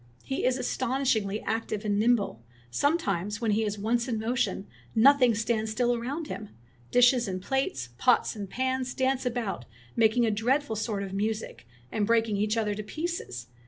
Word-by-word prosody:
"He 270 - -2
is 255 0 +2
astonishingly 250 -5 0
active 220 -1 -2
and 205 -1 +1
nimble. 215 - +2 0.3
Sometimes, 205 - 0
when 230 -3 0
he 215 +2 +2
is 210 -1 -2
once 230 +4 0
in 235 -3 -1
motion, 220 -4 -1 0.3
no 255 +6 +8
thing 250 -5 +3
stands 220 0 0
still 240 +2 +1
around 270 +7 -3
him. 215 -7 -6 0.4
Dishes 245 -1 +5
and 185 -1 -3
plates, 185 - -2
pots 245 - +3
and 200 -3 -6
pans, 260 +2 -1
dance 260 -1 +1
about, 230 - -3 0.3
making 230 +1 +4
a 220 - +2
dreadful 240 +4 +1
sort 210 -2 -2
of 195 -1 -6
music, 210 - -3 0.2
and 205 -2 0
breaking 225 -2 +2
each 210 +2 0
other 210 -2 +1
to 210 - -4
pieces. 305 - -4
225 Hz, 170 wpm, -28 LUFS, 210-250 Hz, 0.4 s, no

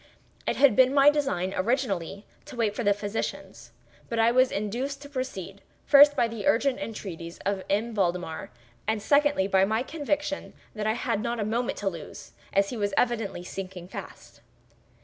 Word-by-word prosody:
It - - +1
had 275 -6 +5
been 260 +3 +5
my 280 +1 +7
design, 190 -11 -1
originally, 200 -4 -1 0.2
to - - -10
wait 220 -3 0
for 240 - -2
the 205 - +4
physicians; 205 +1 -4 0.4
but 230 - -2
I 225 +1 +4
was 255 +1 +4
induced 240 +7 -3
to 285 - -10
proceed, 200 -8 -5 0.2
first, 290 0 +8
by 235 - +2
the 225 -3 -5
urgent 260 +3 +2
entreaties 175 -6 -6
of 195 -1 -1
M. 220 +4 0
Valdemar, 180 -5 -1 0.4
and 220 0 +1
secondly, 285 -4 +3
by 190 -1 +4
my 220 +4 +1
conviction 295 0 -3 0.2
that 215 -1 -3
I 215 - +2
had 215 -3 -1
not 235 0 -2
a 210 - 0
moment 235 +3 -1
to 205 - -3
lose, 170 -5 -6 0.2
as 200 0 +2
he 245 - -4
was 205 -2 -1
evidently 225 -7 0
sinking 185 -1 -7
fast. - - -10
220 Hz, 175 wpm, -27 LUFS, 195-255 Hz, 0.4 s, first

